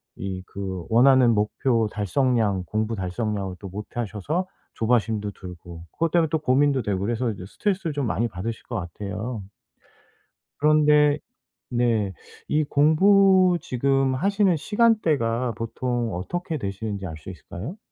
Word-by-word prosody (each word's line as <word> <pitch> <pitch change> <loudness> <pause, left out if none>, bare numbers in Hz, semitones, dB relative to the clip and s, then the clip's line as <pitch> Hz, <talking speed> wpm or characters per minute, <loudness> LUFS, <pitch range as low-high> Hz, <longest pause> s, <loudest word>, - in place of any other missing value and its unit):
이 95 -1 -5
그 95 -3 -5
원하는 125 +1 +5
목표 110 +2 +1
달성량, 105 -2 +1
공부 110 +1 -2
달성량을 95 0 -3
또 100 - -8
못하셔서 110 - -3 0.3
조바심도 110 -3 0
들고 85 -2 -10
그것 165 0 0
때문에 165 -2 +3
또 160 - +1
고민도 140 -1 +2
되고 100 -3 -1
그래서 115 +5 -1
이제 95 -3 -8
스트레스를 190 - -2
좀 140 -3 -1
많이 115 +2 0
받으실 110 +4 -5
것 120 - -7
같아요. 100 +5 -5 1.1
그런데 150 -1 +4 0.5
네 115 -5 +1 0.4
이 155 +1 +2
공부 185 +5 +5
지금 135 +1 +1
하시는 200 +4 +2
시간대가 150 - +1
보통 120 0 -2
어떻게 165 - -3
되시는지 100 -2 -4
알 80 - -6
수 80 - -11
있을까요? 95 - -8
120 Hz, 300 characters per minute, -24 LUFS, 100-150 Hz, 1.1 s, 원하는